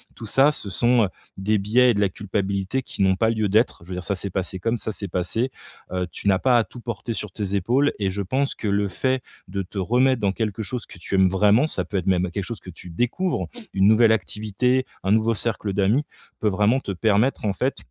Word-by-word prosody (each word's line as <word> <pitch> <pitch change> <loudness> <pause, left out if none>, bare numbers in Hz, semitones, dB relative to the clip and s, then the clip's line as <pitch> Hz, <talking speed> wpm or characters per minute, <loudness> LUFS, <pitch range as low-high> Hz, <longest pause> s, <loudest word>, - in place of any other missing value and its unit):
Tout 115 - -8
ça, 135 +7 +4
ce 125 -8 -6
sont, 120 +4 +3
heu, 95 - -4 0.3
des 105 +3 +1
biais 120 +5 +4
et - - +1
de 100 - 0
la 100 - +3
culpabilité 100 +4 -2
qui 125 - -6
n'ont 95 -1 +4
pas 110 +3 +2
lieu 110 -2 0
d'être. 110 -3 +1
Je - - -17
veux 90 - -4
dire 90 - -5
ça 100 - -1
s'est 100 +2 -4
passé 95 0 -3
comme 115 +5 0
ça 110 - -3
s'est 100 -1 -4
passé. 90 +9 -1 0.4
Heu, 90 0 -1
tu - - -5
n'as 95 -2 +4
pas 125 +1 +4
à 115 - +4
tout 125 - -12
porter 115 0 -4
sur 105 -2 -4
tes 100 0 -3
épaules 125 +9 +2
et 95 -2 0
je 100 +1 -3
pense 135 +9 0
que 110 - -5
le 100 0 +1
fait 130 +6 -1 0.2
de 100 +1 -3
te 95 +3 -9
remettre 125 +6 +2
dans 100 -2 +1
quelque 110 -1 -2
chose 120 +3 -4
que - - -13
tu 95 - -3
aimes 95 -1 +5
vraiment, 105 +8 +4
ça 90 - -2
peut 100 - -8
être 90 - -3
même 90 -1 +2
quelque 100 +2 -3
chose 110 +2 -6
que - - -12
tu 90 +1 -10
découvres, 125 - -1 0.3
une 95 +1 +4
nouvelle 110 +1 +6
activité, 110 +6 0 0.2
un 95 - +2
nouveau 110 +1 +2
cercle 110 -2 -2
d'amis, 100 +8 +2 0.4
peut 105 - +3
vraiment 105 +7 +2
te 100 - -4
permettre 105 +5 +3 0.2
en 100 - +1
fait, 130 +7 -1
105 Hz, 250 wpm, -23 LUFS, 95-120 Hz, 0.4 s, nouvelle